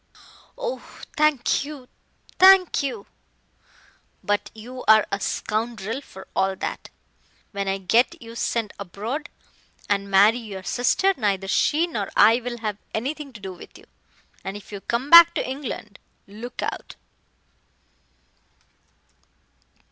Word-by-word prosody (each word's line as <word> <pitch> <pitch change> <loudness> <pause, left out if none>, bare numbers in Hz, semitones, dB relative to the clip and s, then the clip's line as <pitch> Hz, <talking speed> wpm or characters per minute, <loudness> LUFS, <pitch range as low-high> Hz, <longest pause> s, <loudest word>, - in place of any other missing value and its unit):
"Oh, - - -3 0.4
thank 305 -5 +2
you 285 -3 -9 0.5
thank 375 -3 +6
you 245 -8 -4 0.6
" - - -32
"But 205 - 0
you 250 +4 -9
are 220 0 +7
a 200 - -1
scoundrel 225 +3 -3
for 190 -8 -13
all 190 0 +1
that. - - -5 0.6
When 200 -1 -3
I 195 0 0
get 225 +6 +2
you 230 -1 -11
sent 230 -2 -2
abroad 215 - -5 0.6
and 200 -1 -1
marry 205 +5 +5
your 200 -5 -8
sister, 255 - +2
neither 195 -5 -1
she 305 - +2
nor 215 - -4
I 225 +2 +6
will 245 0 -5
have 210 -2 -3 0.2
anything 280 +5 -4
to 220 - -11
do 190 -1 -7
with 175 - -14
you. - - -18 0.6
And 195 +1 -5
if 205 - -14
you 200 -1 -7
come 245 +7 -3
back 340 0 +10
to - - -1
England, 260 -6 -6 0.3
look 220 +5 -8
out." - - -5
230 Hz, 135 wpm, -23 LUFS, 200-275 Hz, 0.6 s, back